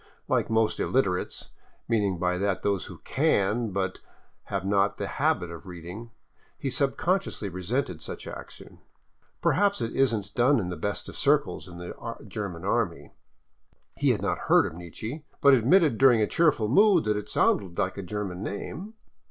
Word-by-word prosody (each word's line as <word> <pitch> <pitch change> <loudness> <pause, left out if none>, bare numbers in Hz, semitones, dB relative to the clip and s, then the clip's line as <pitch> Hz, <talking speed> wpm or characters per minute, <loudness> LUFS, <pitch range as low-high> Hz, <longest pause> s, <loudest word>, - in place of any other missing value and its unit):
Like - - +1
most 110 -1 +2
illiterates 95 -9 -1 0.2
— - - -37
meaning 105 -5 +1
by 90 +1 0
that 100 -1 -1
those 100 -2 0
who - - -10
can, 105 +4 +1
but 95 -1 -2 0.5
have 100 -2 -3
not 100 +1 +2
the 100 - -3
habit 135 - 0
of 85 +1 -10
reading 90 +6 -8 0.2
— - - -36
he 135 - -3
sub 135 +1 0
consciously 185 - -1
resented 95 - -2
such - - -7
action. - - -10 0.6
Perhaps 200 +1 +3
it 115 -2 -3
isn't 110 -7 +1
done 125 +2 +4
in 90 -4 -3
the 90 - -3
best 100 +5 -3
circles - - +1
of 85 -1 -10
the 90 +6 -7
German 95 -4 -5
army. 100 -5 -1 0.8
He - - +1
had - - +1
not - - 0
heard - - +6
of - - -4
Nietzsche, 110 - -7 0.2
but 140 -1 +6
admitted 135 - +4
during 130 -4 +6
a 105 - +3
cheerful 150 -6 +2
mood 190 - +5
that 105 0 +1
it 105 0 -5
sounded 95 -4 +1
like 95 - 0
a 100 - -5
German 95 -1 -4
name. 175 - -6
105 Hz, 170 wpm, -27 LUFS, 95-130 Hz, 0.8 s, heard